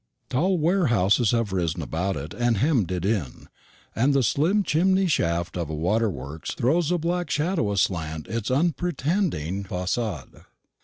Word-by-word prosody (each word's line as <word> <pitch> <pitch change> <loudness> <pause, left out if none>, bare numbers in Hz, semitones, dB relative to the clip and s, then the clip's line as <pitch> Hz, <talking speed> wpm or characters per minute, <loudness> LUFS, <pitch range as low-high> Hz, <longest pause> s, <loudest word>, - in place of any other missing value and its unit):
Tall 180 +8 +2
warehouses 125 - +2
have 115 -4 0
arisen 85 -2 -1
about 90 +6 -2
it 75 +4 -6
and 120 -2 +1
hemmed 120 - +1
it 90 -1 -2
in, 100 - -2 0.5
and 135 +5 +2
the 135 - +3
slim 170 - +2
chimney 190 +4 +2
shaft 85 - 0
of 85 -4 -3
a 80 - -3
waterworks 80 - -2
throws 160 +7 +1
a 180 - +2
black 175 +2 -2
shadow 155 - 0
aslant 80 -6 -1
its 115 -2 -3
unpretending 150 - 0
facade. 95 - -4
115 Hz, 145 wpm, -25 LUFS, -, 0.5 s, the